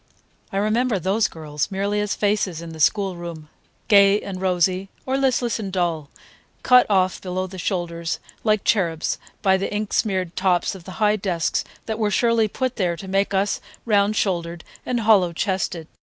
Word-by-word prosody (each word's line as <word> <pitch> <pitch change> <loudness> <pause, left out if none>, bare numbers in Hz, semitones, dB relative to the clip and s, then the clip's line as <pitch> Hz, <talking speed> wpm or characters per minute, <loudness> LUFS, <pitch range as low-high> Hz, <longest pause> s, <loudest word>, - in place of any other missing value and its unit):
I 195 - -3
remember 220 +2 +1
those 195 +5 +1
girls 150 -1 -4
merely 200 +1 -1
as 210 -1 -1
faces 205 -5 0
in 170 0 -8
the 160 - -10
schoolroom, 170 -4 -1 0.4
gay 200 -1 +6
and 190 -3 -6
rosy, 185 +1 +1 0.2
or 265 - 0
listless 255 -4 +1
and 200 -3 -4
dull, 170 -5 -1 0.5
cut 250 -2 +6
off 185 -2 +2
below 185 0 -3
the 185 0 -9
shoulders, 170 -3 -2 0.3
like 215 -2 +2
cherubs, 170 -6 0 0.2
by 190 -2 +4
the 195 - -3
ink 210 0 -3
smeared 185 -4 0
tops 185 -2 +1
of 185 -3 -11
the 185 - -8
high 210 +2 +2
desks 180 -4 -1 0.2
that 220 0 -3
were 215 -2 +1
surely 230 +1 +2
put 255 +4 -3
there 180 -5 0
to 190 - -9
make 195 +1 +1
us 195 +1 0 0.2
round 205 -1 +3
shouldered 170 -4 -1 0.2
and 245 -2 0
hollow 200 -6 +4
chested. 185 -3 -2
195 Hz, 170 wpm, -22 LUFS, 175-210 Hz, 0.5 s, gay